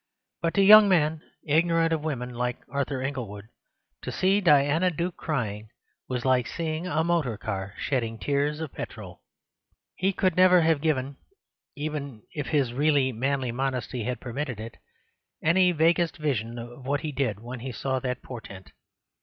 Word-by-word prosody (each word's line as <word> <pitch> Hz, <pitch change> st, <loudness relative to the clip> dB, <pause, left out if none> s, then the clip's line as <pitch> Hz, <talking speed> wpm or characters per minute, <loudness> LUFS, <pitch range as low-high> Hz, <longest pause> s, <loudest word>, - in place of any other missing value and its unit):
But 165 Hz, -1 st, -1 dB
to 200 Hz, -, +5 dB
young 210 Hz, +1 st, +9 dB
men 160 Hz, -3 st, +2 dB, 0.2 s
ignorant 165 Hz, +2 st, +2 dB
of 155 Hz, -2 st, -2 dB
women, 125 Hz, -5 st, -3 dB
like 125 Hz, 0 st, -2 dB
Arthur 140 Hz, 0 st, -2 dB
Inglewood, 115 Hz, -7 st, -5 dB, 0.5 s
to -, -, -5 dB
see 195 Hz, +2 st, +2 dB
Diana 150 Hz, +1 st, +4 dB
Duke 170 Hz, +1 st, -3 dB
crying 110 Hz, -8 st, -3 dB, 0.4 s
was 125 Hz, -1 st, -3 dB
like 130 Hz, -2 st, +3 dB
seeing 160 Hz, +4 st, -3 dB
a 160 Hz, -2 st, +1 dB
motor 160 Hz, -10 st, 0 dB
car 100 Hz, -3 st, -5 dB
shedding 115 Hz, -5 st, -1 dB
tears 145 Hz, +5 st, -1 dB
of 160 Hz, -4 st, -5 dB
petrol. -, -, -8 dB, 0.7 s
He 190 Hz, +1 st, 0 dB
could 185 Hz, -2 st, +1 dB
never 180 Hz, -1 st, +6 dB
have 160 Hz, -3 st, +2 dB
given 140 Hz, -3 st, -1 dB, 0.6 s
(even 145 Hz, -6 st, -5 dB
if 150 Hz, -2 st, -4 dB
his 135 Hz, -6 st, +1 dB
really 140 Hz, -1 st, +2 dB
manly 130 Hz, +1 st, -1 dB
modesty 125 Hz, -1 st, -2 dB
had 125 Hz, -2 st, -2 dB
permitted 125 Hz, -1 st, -4 dB
it) 115 Hz, +1 st, -8 dB, 0.7 s
any 180 Hz, +3 st, +4 dB
vaguest 170 Hz, +1 st, +2 dB
vision 120 Hz, -7 st, -2 dB
of 120 Hz, +2 st, -9 dB
what 145 Hz, +1 st, 0 dB
he 155 Hz, -, -3 dB
did 130 Hz, -7 st, -1 dB
when 120 Hz, +2 st, -7 dB
he 130 Hz, +2 st, -5 dB
saw 130 Hz, +1 st, -2 dB
that 125 Hz, -1 st, -4 dB
portent. 100 Hz, -7 st, -10 dB
140 Hz, 160 wpm, -26 LUFS, 125-160 Hz, 0.7 s, young